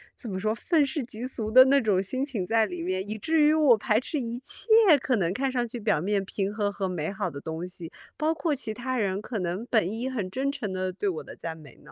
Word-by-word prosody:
怎 235 - -9
么 185 - -3
说， 215 +2 0
愤 310 +2 +2
世 275 0 -3
嫉 235 +1 -6
俗 225 -4 -4
的 255 +3 +9
那 275 +1 +5
种 205 -4 +2
心 255 +8 -2
情 230 -10 -3
在 225 +3 +3
里 180 -4 -6
面， 185 +2 -2
以 215 +1 -4
至 315 +8 +1
于 300 +1 +5
我 295 -7 +5
排 220 -2 +2
斥 295 +4 -3
一 235 -1 -4
切， - - -2 0.3
可 255 - +1
能 175 -2 0
看 265 +5 -1
上 245 -2 -1
去 240 +1 -6
表 205 -7 +1
面 200 +2 0
平 200 +1 -3
和 205 -2 -1
和 195 -1 -3
美 175 -1 -3
好 205 -1 -2
的 140 - -7
东 160 +2 -5
西， 175 -2 -6 0.3
包 315 +1 +1
括 320 -2 0
其 225 -5 -2
他 255 +3 -3
人 195 -2 0
可 220 0 -4
能 180 +5 -3
本 220 -6 +2
应 245 +4 -3
很 205 -7 -3
真 270 +7 -1
诚 215 -9 -4
地 185 0 -2
对 200 +3 -3
我 175 -5 -2
的 - - -11
赞 165 -1 -6
美 150 -5 -14
呢。 150 - -15
215 Hz, 285 characters per minute, -27 LUFS, 185-255 Hz, 0.3 s, 的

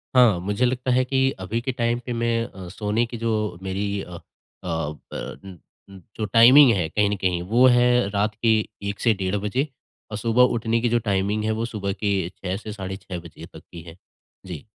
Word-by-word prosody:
हाँ, 120 -8 +5
मुझे 100 +7 0
लगता 125 +1 -1
है 130 +1 +3
कि 135 0 +2
अभी 100 +5 -3
के 130 - -2
टाइम 120 -1 -1
पे 125 - -3
मैं 115 0 0
अ, 95 -6 -10
सोने 105 +4 -1
की 115 0 -7
जो 110 -4 -1
मेरी 100 +1 -2
अ - - -9
अ, 85 - -8 0.5
ब 80 -3 -3
अ - - -6
अ, 95 0 -11 0.2
जो 110 - -1
टाइमिंग 120 +6 +7
है 90 -5 0
कहीं 105 +2 +1
न 105 - -1
कहीं, 90 -2 0
वो 115 +8 +3
है 120 -3 +4
रात 105 +1 -1
के 115 - +3 0.4
1:00 100 - -6
से 115 - +3
डेढ़ 95 -1 -2
बजे 130 +8 0 0.4
और 105 - -3
सुबह 115 +3 +3
उठने 115 0 0
की 120 - +1
जो 120 +1 +2
टाइमिंग 100 +2 0
है, 110 - 0
वो 110 +1 -1
सुबह 100 -4 -3
के 100 -4 -1
6:00 95 0 -3
से 110 +1 -8
साढ़े 95 -1 -6
6 95 -2 -7
बजे 85 -2 -12
तक - - -14
की 85 - -9
है। 85 +1 -13 0.5
जी। 85 -6 -8
105 Hz, 215 wpm, -23 LUFS, 95-120 Hz, 0.5 s, टाइमिंग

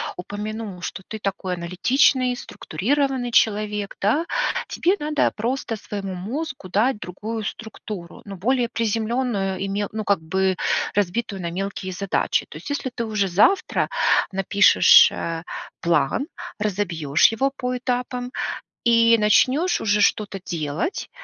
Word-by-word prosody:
упомянул, 210 +1 -6
что 190 - -5
ты 220 - -5
такой 195 -3 -3
аналитичный, 250 +9 +2
структурированный 250 - -2
человек, 210 -2 +1
да: 290 +12 +1 0.4
тебе 355 - +1
надо 300 0 +1
просто 235 +1 -2
своему 200 -2 -6
мозгу 235 - -5
дать 215 +5 +1
другую 215 +5 -5
структуру, 210 -4 -7
ну 200 -1 -7
более 240 +5 +1
приземленную, 225 -3 -1
и 195 - -3
ме 205 +1 -1
ну, 215 0 -3
как 200 -5 +1
бы 190 +4 0 0.4
разбитую 205 0 -1
на 170 - -3
мелкие 190 +1 -4
задачи. 195 +1 0
То - - -10
есть - - -9
если 285 -2 -2
ты 235 -1 -3
уже 210 -3 0
завтра 205 - +2 0.4
напишешь, 195 +1 +6
э, 165 -1 -4 0.4
план, 170 - +1 0.3
разобьешь 175 -8 +2
его 265 +5 +1
по 250 -2 -2
этапам 250 0 -3 0.5
и 230 0 +5
начнешь 255 +11 +3
уже 210 -1 +2
что-то 200 -1 +1
делать, 155 - -3
210 Hz, 130 wpm, -23 LUFS, 190-245 Hz, 0.5 s, напишешь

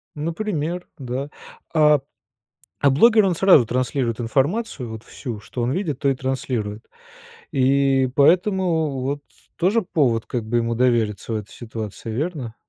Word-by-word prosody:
Например, 170 +1 -3
да. 135 +1 -4 0.4
А, 150 -2 +5 0.8
а 140 - +4
блогер 215 - +5
он 180 -3 +1
сразу 180 -10 +6
транслирует 125 -1 -1
информацию, 135 - -1
вот 110 0 -8
всю, 120 -6 -7
что 120 - -6
он 120 +2 0
видит, 160 -6 -2
то 140 - +2
и 135 - +1
транслирует. 125 -5 -3 0.6
И 135 -1 +3
поэтому 165 -3 +2
вот 140 +2 -2
с - - -20
тоже 200 +6 +2
повод 130 - +1
как 120 -3 -3
бы 120 +2 0
ему 115 0 0
довериться 115 -3 +1
в - - 0
этой 105 -1 -8
ситуации, 110 -1 -7
верно? 135 -2 -3
135 Hz, 145 wpm, -22 LUFS, 120-160 Hz, 0.8 s, сразу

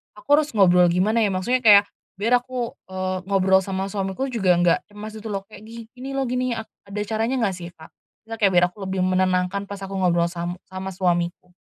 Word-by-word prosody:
aku 210 - -16
harus 300 -1 -2
ngobrol 180 -3 +5
gimana 200 +6 +2
ya, - - +3
maksudnya 195 +8 0
kayak 205 -2 +8 0.3
biar 230 +5 +2
aku, 250 -2 -4 0.2
eee, 185 0 -2
ngobrol 190 -1 +4
sama 190 0 -3
suamiku 195 +6 -2
juga 190 -7 +2
nggak 175 +1 +3
cemas 210 +1 -8
gitu 220 - -8
loh, 195 -1 -3
kek, 210 - -13
"Gini 235 +3 -10
loh 270 - 0
gini," 250 +1 -1
a 220 - -4 0.2
ada 210 +1 -4
caranya 225 +4 -1
nggak 195 -4 0
sih 175 -1 -8
Kak? 160 0 -15 0.3
Nggak 225 0 -7
biar 180 -1 +4
aku 195 0 -8
lebih 190 -1 0
menenangkan 185 +1 0
pas 200 - -5
aku 195 - -8
ngobrol 170 -2 +3
sam 175 0 -4 0.2
sama 190 0 -5
suamiku. 175 0 -1
195 Hz, 200 wpm, -23 LUFS, 185-220 Hz, 0.3 s, kayak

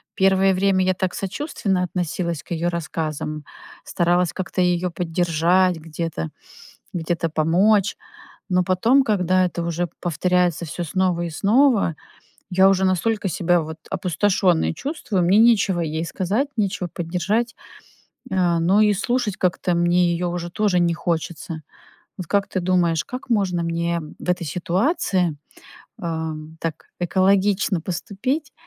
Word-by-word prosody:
Первое 190 0 +4
время 190 0 +2
я 185 - +2
так 185 0 -2
сочувственно 195 - -2
относилась 170 -2 -3
к - - -22
её 170 +1 0
рассказам, 155 -2 -4 0.4
старалась 175 -2 +1
как-то 185 0 -2
её 180 0 +1
поддержать 175 +1 +1
где-то, 160 - -4 0.7
где-то 165 -1 -1
помочь, 185 +7 +2 0.5
но 180 -1 +3
потом, 225 +10 +3
когда 185 -5 +2
это 170 -1 -3
уже 170 +1 -1
повторяется 175 0 +1
всё 170 +3 -5
снова 180 +1 0
и 170 - -3
снова, 215 - +3 0.6
я 190 +1 +5
уже 190 0 +2
настолько 195 +2 0
себя, 175 +1 +2
вот, 160 0 -7
опустошённой 185 -2 +1
чувствую, 220 - -2
мне 185 +4 +4
нечего 220 -5 +4
ей 160 +1 -2
сказать, 205 - -1
нечего 190 -4 -1
поддержать, 200 +8 -1 0.8
э, 180 -3 +2
но 180 +5 +3
и 210 -1 +4
слушать 230 0 -1
как-то 180 -1 0
мне 175 0 +3
её 175 +1 -2
уже 175 0 -4
тоже 195 -1 +1
не 170 -1 +2
хочется. 165 -1 -3 0.6
Вот 185 -4 -6
как 200 +2 +1
ты 185 - -1
думаешь, 175 -3 +2
как 250 0 -8
можно 190 -6 +1
мне 170 0 -1 0.2
в - - -6
этой 180 -1 0
ситуации, 180 - 0 0.7
э, 160 -1 -2 0.3
так 160 -2 -4
экологично 190 +1 +2
поступить, 220 - -3
180 Hz, 135 wpm, -22 LUFS, 170-195 Hz, 0.8 s, я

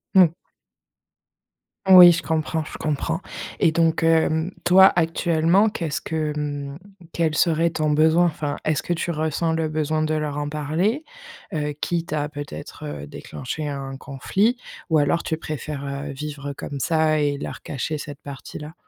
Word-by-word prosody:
Mmh. 185 -3 +8 1.6
Oui, 180 -2 +10
je 170 - 0
comprends, 160 0 -1
je - - -8
comprends. 150 -3 -2 0.4
Et 165 - +4
donc, 165 0 +2
hem, 160 +1 +2
toi, 190 +2 +7
actuellement, 170 +3 +3
qu'est-ce 170 -5 -3
que, 155 -2 -2
hem, 145 -1 -4 0.4
quel 160 -2 0
serait 165 +1 +3
ton 155 -2 0
besoin? 160 +3 +4
Enfin, 150 -3 -2
est-ce 155 -1 +1
que - - -4
tu 170 +1 -2
ressens 160 +1 -1
le 160 -1 -1
besoin 155 0 0
de 155 0 0
leur 150 -2 -2
en 145 0 -2
parler, 160 - -1 0.5
heu, 150 -1 -1
quitte 170 -1 -2
à 150 -1 0
peut-être, 145 - -8
heu, 75 -1 -6
déclencher 150 - -6
un 135 -1 -5
conflit? 190 - 0 0.3
Ou 160 - +4
alors 145 +4 +1
tu 160 - -2
préfères, 150 -2 -5
heu, 140 +1 -4
vivre 145 0 -6
comme 140 0 -6
ça 155 +1 +2
et 145 -1 +1
leur - - -6
cacher 150 +3 -3
cette 145 -1 -8
partie-là? 145 +2 -8
155 Hz, 160 wpm, -23 LUFS, 145-165 Hz, 1.6 s, Oui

